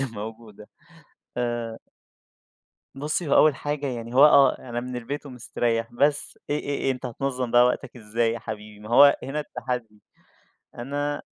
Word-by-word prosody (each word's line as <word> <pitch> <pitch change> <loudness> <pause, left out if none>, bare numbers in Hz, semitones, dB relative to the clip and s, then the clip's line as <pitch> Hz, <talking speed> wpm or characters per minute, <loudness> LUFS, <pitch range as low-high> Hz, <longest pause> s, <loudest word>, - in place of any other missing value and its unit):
اللي 135 - +1
موجودة 110 0 -9 0.7
آآ 120 -2 -2 1.2
بُصّي 150 +3 -2
هو - - +3
أول 155 -2 +6
حاجة، 145 +1 -3
يعني 120 -2 -5
هو 140 +3 +8
آه 140 -3 +6
أنا 120 -1 -5
من 125 0 -6
البيت 140 +5 -5
ومستريّح 120 -2 -2
بس 145 +4 0
إيه 150 - +1
إيه - - -9
إيه، 135 - +1
أنت 125 0 -6
هتنظّم 125 0 -3
بقى 120 +1 +6
وقتك 125 0 -2
إزاي 115 +1 0
يا 115 - -4
حبيبي؟ 105 -1 -8
ما 105 - -10
هو 140 +4 +7
هنا 150 +3 -3
التحدي، 120 -7 -5 0.8
أنا 145 +4 -3
125 Hz, 160 wpm, -25 LUFS, 115-140 Hz, 1.2 s, هو